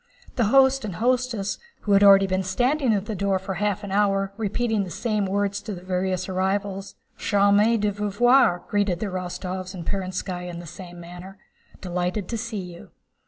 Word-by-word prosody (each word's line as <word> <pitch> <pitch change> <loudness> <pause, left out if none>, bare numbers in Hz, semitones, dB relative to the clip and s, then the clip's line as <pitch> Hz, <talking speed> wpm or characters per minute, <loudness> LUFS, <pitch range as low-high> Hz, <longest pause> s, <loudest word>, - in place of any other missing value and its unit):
The 240 - +2
host 265 +3 +4
and 200 -5 -4
hostess, 240 -3 0 0.2
who 205 - -2
had 200 0 +6
already 195 -1 +8
been 185 0 0
standing 250 +8 +1
at 200 -2 0
the 220 - -4
door 200 -1 0
for 190 +1 -5
half 205 +2 -1
an 200 - -6
hour 195 -1 +1
repeating 220 0 -1
the 185 - -6
same 210 +1 -1
words 200 +1 -1
to 210 -3 -6
the 180 - -11
various 185 0 -1
arrivals, 195 +1 -2 0.2
"Charmé 205 +3 +3
de 210 0 +1
vous 205 +1 -3
voir," 240 -7 +4
* - - -28
greeted 205 -5 0
the 215 - -2
Rostóvs 185 0 -5
and 170 -2 -7
Perónskaya 185 -1 -3
in 170 - -7
the 175 - -8
same 175 +1 -10
manner. 175 +3 -10 0.2
* - - -26
"Delighted 180 +2 -2
to 230 - -2
see 220 -4 -4
you." 170 - -13
195 Hz, 195 wpm, -24 LUFS, 185-210 Hz, 0.2 s, already